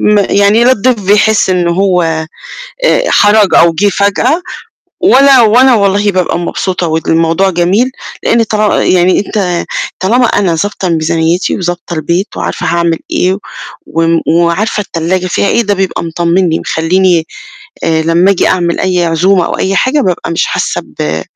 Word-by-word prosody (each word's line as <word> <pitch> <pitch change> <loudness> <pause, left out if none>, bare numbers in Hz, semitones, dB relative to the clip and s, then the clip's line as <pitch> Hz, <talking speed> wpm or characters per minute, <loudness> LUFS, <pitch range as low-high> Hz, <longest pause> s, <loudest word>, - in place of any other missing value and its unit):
م - - +4
يعني 205 +3 +3
لا 255 - +4
الضيف 250 -1 0
بيحس 205 +1 +2
إن 180 -2 0
هو 180 0 +1 0.8
آآ - - +2
حَراج 205 -1 +3
أو 170 -1 +4
جِه 200 +5 +1
فجأة 215 - 0 0.6
ولا 275 - +5
وأنا 245 +4 +4
والله 205 0 +1
بابقى 180 -2 -1
مبسوطة 180 0 -3
والموضوع 165 +3 0
جميل، 190 +9 0 0.3
لإن 230 0 +2
طال 215 -1 0
يعني 180 0 +2
أنت 185 -4 -2 0.3
طالما 240 +7 +2
أنا 180 -5 0
ضابطة 195 +1 -3
ميزانيّتي 165 +2 0
وضابطة 175 -1 -4
البيت 170 +5 -2
وعارفة - - -4
هاعمل 170 -1 0
إيه 185 +1 0 0.5
وم 165 +1 0
وعارفة 170 +6 0
التلّاجة 185 0 -3
فيها 200 - -1
إيه، 235 - +1
ده 205 -1 0
بيبقى 190 -2 -2
مطمّنني، 170 +1 0
مخلّيني 170 0 0 0.6
آآ 160 -1 0
لمّا 170 +4 +2
آجي 195 - +1
أعمل 175 -2 -1
أي 180 -2 0
عزومة 175 +2 +1
أو - - -4
أي 195 +1 -1
حاجة 285 +7 +1
بابقى 180 -6 -2
مش 165 - 0
حاسّة - - -2
ب 80 +1 -4
185 Hz, 150 wpm, -10 LUFS, 170-205 Hz, 0.8 s, ولا